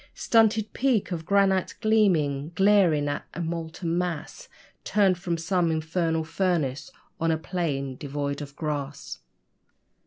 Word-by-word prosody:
Stunted 220 -2 +2
peak 245 -8 +1
of 165 -2 -4
granite 195 -2 +2
gleaming, 170 -9 +2
glaring 190 -6 +4
like 145 0 -2
a - - -5
molten 165 0 -3
mass 175 -4 -4 0.3
Turned 195 -4 +2
from 175 -2 -2
some 175 0 +1
infernal 160 +1 0
furnace 160 -6 -1 0.3
on 165 - +1
a 160 - +2
plain 145 -7 -3
devoid 140 0 -4
of 140 -1 -8
grass. 145 -2 -4
165 Hz, 125 wpm, -26 LUFS, 150-190 Hz, 0.3 s, glaring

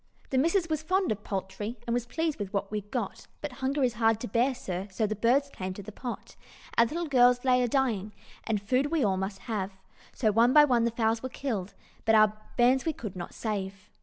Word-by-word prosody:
"The 260 - +3
missus 335 +5 +2
was 310 -2 -1
fond 370 - +1
of 210 -1 -3
poultry, 205 +4 -4
And 235 - -1
was 240 0 -1
pleased 320 +3 -2
with 200 -2 -4
what 200 0 -2
we'd 210 -1 -4
got; 230 -5 -4
But 295 - -5
hunger 270 +2 +1
is 245 -2 +2
hard 225 -1 +2
to 245 - -3
bear, 245 +6 +2
sir, 190 -4 -4
So 205 +3 -1
the 215 +1 -2
birds 245 +7 +3
came 185 0 -5
to 200 - -8
the 215 - -8
pot. 245 +3 -7 0.4
Our 235 - +5
little 340 +7 -3
gals 250 -3 +4
lay 250 -1 +4
a 245 - +2
dying, 225 -6 0 0.3
And 220 -2 0
food 255 +8 +1
we 320 -1 +1
all 195 -3 +2
must 190 +1 -4
have, 205 -5 -3 0.4
So 220 -4 +1
one 230 +4 +4
by 300 -1 +8
one 240 -4 +2
the - - +3
fowls 225 -1 0
were 260 - -4
killed, 220 -8 -4 0.3
But 225 - +4
our 215 -1 +6 0.2
bairns 250 +2 +4
we 320 - 0
could 215 -9 -7
not 175 -1 -7
save. 195 -3 -4
230 Hz, 230 wpm, -28 LUFS, 205-260 Hz, 0.4 s, by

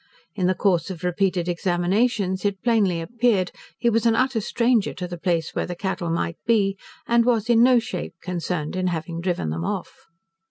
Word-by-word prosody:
In 185 -4 0
the 185 - +2
course 185 -2 +1
of 180 -3 -7
repeated 180 0 0
examinations 185 +3 0
it 200 -2 -1
plainly 210 -8 +2
appeared, 225 -1 +1 0.3
he 235 - -1
was 230 0 +3
an 225 - +4
utter 255 -2 +1
stranger 235 +1 +1
to 180 -1 -4
the 175 - -6
place 170 -2 -1
where - - -2
the 175 - -4
cattle 180 -2 -3
might 165 0 -1
be, 200 -4 +3 0.3
and 235 0 +4
was 235 -1 +2
in 230 -1 +5
no 250 +1 +6
shape 230 -5 -3
concerned 175 -2 -3
in 185 0 0
having 165 -1 -3
driven 170 - -1
them 80 +1 -3
off. - - -5
190 Hz, 190 wpm, -23 LUFS, 175-230 Hz, 0.3 s, no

